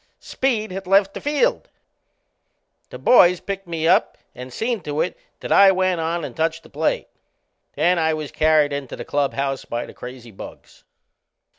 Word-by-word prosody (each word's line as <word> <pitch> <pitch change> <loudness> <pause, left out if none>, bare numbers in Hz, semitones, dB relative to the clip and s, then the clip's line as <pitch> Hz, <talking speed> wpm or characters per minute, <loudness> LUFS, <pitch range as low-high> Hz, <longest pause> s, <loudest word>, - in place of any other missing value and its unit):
Speed 225 -6 -2
had 190 0 -6
left 195 +1 +3
the - - -7
field. 380 +13 0 1.2
The - - -9
boys 180 -7 +5
picked 195 -1 -6
me 165 -1 -2
up - - +3 0.2
and 125 +1 -9
seen 225 - -2
to 150 -1 -4
it - - -2 0.3
that - - -6
I 195 -1 +7
went 185 -2 0
on 165 0 -2
and 130 - -9
touched 160 +1 -1
the - - -18
plate. 155 +2 -1 0.7
Then 175 0 +2
I 160 -1 +1
was 155 -2 -6
carried 155 -2 +3
into 140 -3 -5
the - - -8
clubhouse 140 -1 -1
by 120 0 -4
the - - -12
crazy 125 -1 -10
bugs. 95 - -13
165 Hz, 170 wpm, -21 LUFS, 145-195 Hz, 1.2 s, I